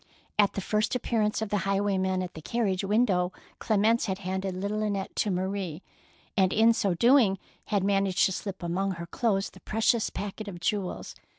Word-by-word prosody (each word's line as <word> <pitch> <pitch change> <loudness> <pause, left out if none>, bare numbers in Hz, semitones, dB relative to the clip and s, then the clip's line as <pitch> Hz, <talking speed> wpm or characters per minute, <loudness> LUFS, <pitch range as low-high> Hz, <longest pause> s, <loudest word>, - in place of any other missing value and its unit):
At 205 -1 +5
the 195 - -3
first 215 +5 0
appearance 220 -3 0
of 220 - -4
the 205 - +1
high 195 0 0
waymen 190 -2 0
at 180 - -7
the 160 - -9
carriage 200 -1 -1
window, 195 -4 +2 0.3
Clem 210 -2 +1
ence 230 +2 +3
had 190 -1 -1
handed 190 0 -3
little 205 +3 -2
Annette 200 -2 -2
to 210 - +1
Marie, 185 -2 -2 0.5
and 190 -3 +3
in 225 +3 +5
so 195 -5 0
doing 235 -1 +5 0.3
had 200 -2 0
managed 195 -1 +2
to - - +1
slip 190 -1 -5
among 190 +3 -1
her 170 -1 -6
clothes 195 +1 0
the - - -15
precious 225 +1 +1
packet 205 +2 -6
of 180 -4 -7
jewels. 190 +1 -2
195 Hz, 190 wpm, -28 LUFS, 190-215 Hz, 0.5 s, At